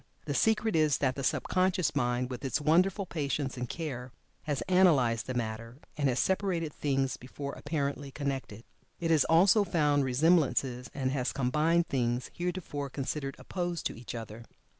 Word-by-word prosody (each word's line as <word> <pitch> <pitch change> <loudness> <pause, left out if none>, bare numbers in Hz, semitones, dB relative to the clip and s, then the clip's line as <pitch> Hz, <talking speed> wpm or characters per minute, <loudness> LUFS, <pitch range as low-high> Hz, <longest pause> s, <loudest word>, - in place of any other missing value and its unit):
The 145 - -2
secret 220 - +2
is 155 -3 +3
that 135 -2 +1
the 135 - -5
sub - - +1
conscious 185 -4 +1
mind 125 -1 0
with 125 - -6
its 135 +2 0
wonderful 180 +6 +2
patience 145 -4 -2
and 125 -2 -4
care 130 -7 -5 0.3
has 145 -3 -1
analyzed 150 -12 +3
the 130 - -3
matter, 115 +1 -4 0.2
and 145 -2 +1
has 125 - 0
separated 180 -4 0
things 135 -2 0
before 140 +2 -7
apparently 145 -2 -3
connected. 135 -6 -4 0.4
It 165 -1 0
has 155 -4 +4
also 185 +6 +5
found 150 -6 +2
resemblances 135 -2 +2
and 130 -2 -1
has 130 -2 -1
combined 155 +6 +2
things 120 -1 -1
heretofore 175 -5 -3
considered 135 +1 -4
opposed 175 -3 -4
to - - -2
each 115 0 -8
other. 115 0 -8
140 Hz, 160 wpm, -30 LUFS, 125-165 Hz, 0.4 s, also